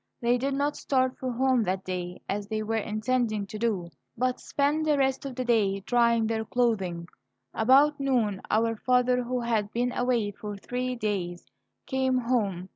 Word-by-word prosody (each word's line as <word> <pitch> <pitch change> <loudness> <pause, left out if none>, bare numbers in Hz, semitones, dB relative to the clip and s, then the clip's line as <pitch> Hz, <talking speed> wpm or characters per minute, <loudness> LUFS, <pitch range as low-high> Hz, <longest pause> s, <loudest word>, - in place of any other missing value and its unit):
They 240 +1 +2
did 275 +2 -1
not 285 +1 0
start 260 -2 0
for 255 -1 -2
home 255 0 +2
that 190 +1 -1
day, 180 -1 -5
as 200 0 -3
they 215 0 -2
were 225 +1 -2
intending 215 0 -1
to 210 +2 -8
do, 200 -7 -1 0.3
but 255 +1 0
spent 290 +2 0
the 300 -1 +3
rest 270 0 +1
of 265 - -7
the 255 0 -3
day 205 -5 +2
drying 235 +1 +3
their 220 0 -1
clothing. 195 -8 0 0.5
About 275 +6 +4
noon 235 -8 +1
our 225 +1 +2
father, 250 +1 +2
who 250 0 -2
had 220 -3 0
been 245 +1 0
away 245 -5 0
for 205 0 -7
three 250 +4 -3
days, 190 -6 -3 0.4
came 265 -1 +1
home. 210 -7 -1
235 Hz, 175 wpm, -27 LUFS, 205-255 Hz, 0.5 s, About